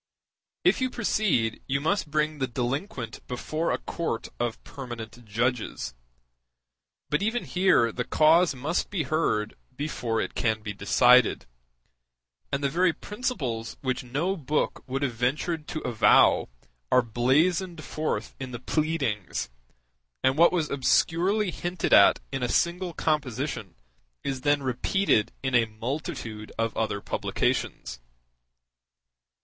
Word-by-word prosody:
If -, -, +3 dB
you 255 Hz, -, +1 dB
proceed, 205 Hz, -, 0 dB
you 135 Hz, 0 st, +1 dB
must 165 Hz, +2 st, 0 dB
bring 155 Hz, 0 st, 0 dB
the 130 Hz, -, 0 dB
delinquent 125 Hz, -, -3 dB
before 155 Hz, +6 st, -2 dB
a -, -, +1 dB
court 165 Hz, -9 st, -4 dB
of 120 Hz, -1 st, -2 dB
permanent 120 Hz, -3 st, -8 dB
judges. 115 Hz, -, -2 dB, 1.2 s
But 150 Hz, -, +2 dB
even 225 Hz, +4 st, 0 dB
here 180 Hz, -11 st, +3 dB
the 125 Hz, -, -2 dB
cause 160 Hz, +4 st, +4 dB
must 145 Hz, +7 st, -1 dB
be 185 Hz, -6 st, -1 dB
heard 110 Hz, -10 st, 0 dB, 0.2 s
before 125 Hz, -5 st, -2 dB
it -, -, -2 dB
can 110 Hz, -2 st, 0 dB
be 105 Hz, -1 st, -4 dB
decided; 125 Hz, +4 st, +4 dB, 1.1 s
and 140 Hz, +1 st, -1 dB
the -, -, +3 dB
very 175 Hz, +3 st, +2 dB
principles 150 Hz, -, -4 dB
which 130 Hz, -2 st, -2 dB
no 145 Hz, +10 st, -1 dB
book 150 Hz, -3 st, -1 dB
would 135 Hz, +2 st, -2 dB
have 130 Hz, -4 st, 0 dB
ventured 150 Hz, +7 st, -1 dB
to 155 Hz, -, -4 dB
avow 120 Hz, -, +4 dB, 0.4 s
are 125 Hz, -, +5 dB
blazoned 155 Hz, -, +1 dB
forth 155 Hz, 0 st, -3 dB
in 130 Hz, -1 st, -5 dB
the 120 Hz, -2 st, -6 dB
pleadings, 125 Hz, -, -1 dB, 0.7 s
and 130 Hz, 0 st, +3 dB
what 170 Hz, +3 st, +6 dB
was 165 Hz, -4 st, -1 dB
obscurely 175 Hz, +8 st, +2 dB
hinted 175 Hz, 0 st, -2 dB
at -, -, +7 dB
in 135 Hz, -1 st, -3 dB
a 125 Hz, -, 0 dB
single 175 Hz, +1 st, 0 dB
composition 140 Hz, -, -2 dB, 0.5 s
is 135 Hz, -2 st, -3 dB
then 145 Hz, 0 st, +2 dB
repeated 130 Hz, -, +1 dB
in 130 Hz, -1 st, -1 dB
a 120 Hz, -2 st, +5 dB
multitude 110 Hz, -2 st, -5 dB
of 115 Hz, 0 st, -1 dB
other 105 Hz, -2 st, -1 dB
publications. 65 Hz, -9 st, -2 dB
135 Hz, 130 wpm, -27 LUFS, 120-165 Hz, 1.2 s, at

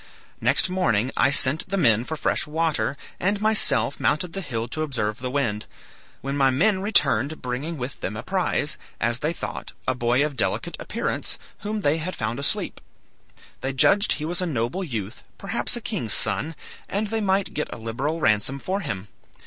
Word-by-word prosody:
Next -, -, +4 dB
morning 130 Hz, -, +1 dB
I 130 Hz, -, +4 dB
sent 140 Hz, +2 st, +3 dB
the 195 Hz, -, 0 dB
men 115 Hz, -, +4 dB
for 160 Hz, -, -4 dB
fresh -, -, 0 dB
water, 155 Hz, -2 st, 0 dB, 0.2 s
and 200 Hz, +3 st, +1 dB
myself 215 Hz, -9 st, +4 dB
mounted 165 Hz, +2 st, +1 dB
the 195 Hz, -, -3 dB
hill 120 Hz, -8 st, -3 dB
to 155 Hz, -, -3 dB
observe 120 Hz, -8 st, -2 dB
the 125 Hz, +1 st, -3 dB
wind; 125 Hz, -6 st, -1 dB, 0.5 s
when 140 Hz, +1 st, -3 dB
my 135 Hz, -2 st, +4 dB
men 190 Hz, +9 st, +2 dB
returned 155 Hz, -, +3 dB
bringing 135 Hz, +7 st, -3 dB
with 130 Hz, +1 st, -5 dB
them 105 Hz, +3 st, -4 dB
a -, -, -5 dB
prize, 185 Hz, -5 st, 0 dB, 0.2 s
as 120 Hz, +1 st, +1 dB
they 150 Hz, +4 st, 0 dB
thought, 170 Hz, -, -6 dB
a 130 Hz, -, +3 dB
boy 125 Hz, +3 st, +2 dB
of 150 Hz, -2 st, -4 dB
delicate -, -, 0 dB
appearance, -, -, -3 dB, 0.2 s
whom 210 Hz, +1 st, -3 dB
they 150 Hz, -2 st, +2 dB
had 180 Hz, +4 st, -4 dB
found 115 Hz, +3 st, -2 dB
asleep. 140 Hz, -, +1 dB, 0.8 s
They 135 Hz, +1 st, -2 dB
judged 200 Hz, +10 st, +5 dB
he 150 Hz, -, -4 dB
was 175 Hz, +3 st, 0 dB
a 180 Hz, -, 0 dB
noble 135 Hz, +5 st, -1 dB
youth, 115 Hz, -, -5 dB
perhaps 200 Hz, +5 st, -2 dB
a 240 Hz, -, -5 dB
king's 195 Hz, -, -3 dB
son, 160 Hz, +2 st, 0 dB, 0.3 s
and 205 Hz, +1 st, -1 dB
they 225 Hz, 0 st, -1 dB
might 195 Hz, -1 st, +1 dB
get 150 Hz, -, -3 dB
a -, -, -6 dB
liberal 125 Hz, +8 st, -2 dB
ransom 110 Hz, +3 st, +2 dB
for 190 Hz, +8 st, -2 dB
him. 110 Hz, -, -4 dB
145 Hz, 185 wpm, -24 LUFS, 125-185 Hz, 0.8 s, judged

